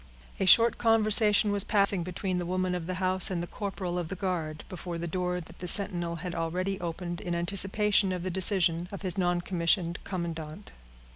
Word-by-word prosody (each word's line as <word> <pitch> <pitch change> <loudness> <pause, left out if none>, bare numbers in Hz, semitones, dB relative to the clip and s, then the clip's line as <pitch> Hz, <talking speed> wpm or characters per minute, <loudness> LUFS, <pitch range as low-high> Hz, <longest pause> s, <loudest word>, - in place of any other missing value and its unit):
A 190 - 0
short 230 +5 +6
conversation 215 -2 +4
was 200 -1 +2
passing 200 -3 +3
between 180 +1 -3
the 175 - -3
woman 185 0 -1
of 175 -2 -4
the 185 - -3
house 185 0 +2
and 175 -3 -2
the - - -3
corporal 185 -2 -4
of 175 - -4
the 190 - -5
guard, 170 -5 -3
before 175 -1 -6
the 170 - -4
door 180 +1 -2
that 170 0 -13
the 180 - -6
sentinel 175 -3 +1
had 175 +1 -6
already 180 +4 -3
opened 175 0 -5
in 175 -1 -3
anticipation 195 +3 +1
of 180 -1 -4
the 185 - -3
decision 175 -2 +2
of 200 0 -8
his 185 -1 -2
noncommissioned 175 -1 0
commandant. 165 - -6
180 Hz, 190 wpm, -28 LUFS, 170-195 Hz, -, short